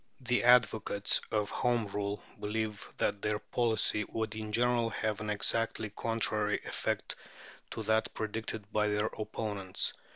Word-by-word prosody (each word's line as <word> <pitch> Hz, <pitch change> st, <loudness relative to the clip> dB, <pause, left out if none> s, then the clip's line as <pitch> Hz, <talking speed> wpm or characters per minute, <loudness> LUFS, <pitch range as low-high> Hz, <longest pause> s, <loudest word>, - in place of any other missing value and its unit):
The 125 Hz, -1 st, +1 dB
advocates 110 Hz, -4 st, +4 dB
of 105 Hz, -2 st, 0 dB
Home 120 Hz, -2 st, +1 dB
Rule 100 Hz, 0 st, -3 dB, 0.2 s
believe 105 Hz, -1 st, -2 dB
that 100 Hz, -, 0 dB
their 105 Hz, 0 st, +1 dB
policy 110 Hz, -2 st, +1 dB
would 110 Hz, +1 st, -3 dB
in 110 Hz, -1 st, -4 dB
general 120 Hz, +1 st, +3 dB
have 110 Hz, -2 st, -2 dB
an 105 Hz, -, -3 dB
exactly 110 Hz, +1 st, +1 dB
contrary 110 Hz, -2 st, +1 dB
effect -, -, -2 dB, 0.5 s
to -, -, -4 dB
that 110 Hz, 0 st, +2 dB
predicted 110 Hz, -1 st, -4 dB
by 105 Hz, 0 st, +2 dB
their 105 Hz, 0 st, +1 dB
opponents. 105 Hz, -3 st, -2 dB
110 Hz, 135 wpm, -32 LUFS, 105-115 Hz, 0.5 s, advocates